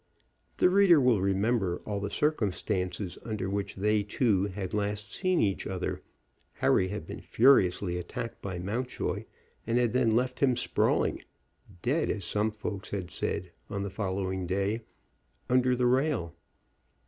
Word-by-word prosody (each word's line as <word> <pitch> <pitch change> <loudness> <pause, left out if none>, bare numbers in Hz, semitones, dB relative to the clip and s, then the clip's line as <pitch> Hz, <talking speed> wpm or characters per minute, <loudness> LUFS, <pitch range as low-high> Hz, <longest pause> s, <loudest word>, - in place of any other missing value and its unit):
The - - +5
reader 185 -3 +6
will 125 -7 +3
remember 100 -1 +1
all 105 -1 -2
the 100 0 -3
circumstances 95 - -1
under 105 -4 -3
which 100 0 -2
they 105 +2 +2
two 100 -1 +1
had 95 -2 -5
last 105 0 -2
seen 185 -2 +1
each 100 -2 0
other 95 -2 -3 0.5
Harry 95 - +2
had 100 -3 -5
been - - -8
furiously 95 -8 +3
attacked 115 +5 -6
by 95 -2 -4
Mountjoy, 115 +8 -3 0.4
and 115 +1 +2
had 120 -2 +2
then 120 -3 +3
left 125 +1 0
him 130 -3 +3
sprawling, - - +1 0.6
dead, 150 +6 +1
as 100 -4 -2
some 105 +1 +1
folks 105 -2 -5
had 95 -3 -4
said 90 0 -3 0.2
on 100 -2 -3
the 100 - -4
following 95 -2 -2
day, 100 +5 0 0.7
under 125 0 +4
the 125 0 +1
rail. 130 - +1
105 Hz, 150 wpm, -29 LUFS, 95-125 Hz, 0.7 s, reader